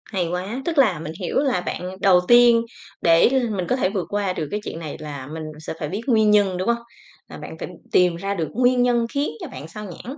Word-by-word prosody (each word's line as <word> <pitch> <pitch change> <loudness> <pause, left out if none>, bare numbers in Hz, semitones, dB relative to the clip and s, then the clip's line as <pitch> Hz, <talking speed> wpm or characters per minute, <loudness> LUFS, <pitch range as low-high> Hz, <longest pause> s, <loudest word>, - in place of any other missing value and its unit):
Hay 185 -5 -2
quá. 190 +8 -3
Tức 335 -2 -2
là 215 - +4
mình 155 0 -6
hiểu 180 - -1
là 265 -10 +1
bạn - - -4 0.2
đầu 185 -2 +6
tiên, 240 -1 +7 0.4
để 165 +4 +5
l 255 -2 +1
mình 180 -3 -2
có 250 - +3
thể 250 -8 +1
vượt 190 -3 -3
qua 205 -2 -1
được 160 -4 -4
cái 210 - -1
chuyện 165 - -6
này 155 -3 -6
là 145 -4 -7
mình 160 +2 -6 0.2
sẽ 155 - -6
phải 150 - -3
biết 200 +6 -4
nguyên 220 -4 +4
nhân, 200 -3 +3
đúng 185 - -3
hông? 235 0 +2 0.5
Là - - -10
bạn - - -9
phải - - -5 0.2
tìm 180 -2 +4
ra 195 +4 -3
được 165 -5 -2
nguyên 250 +1 +3
nhân 240 -1 +2
khiến 285 +1 0
cho - - -5
bạn 130 +4 -9
xao 210 +6 -9
nhãng, 235 - -8
195 Hz, 255 wpm, -22 LUFS, 170-240 Hz, 0.5 s, tiên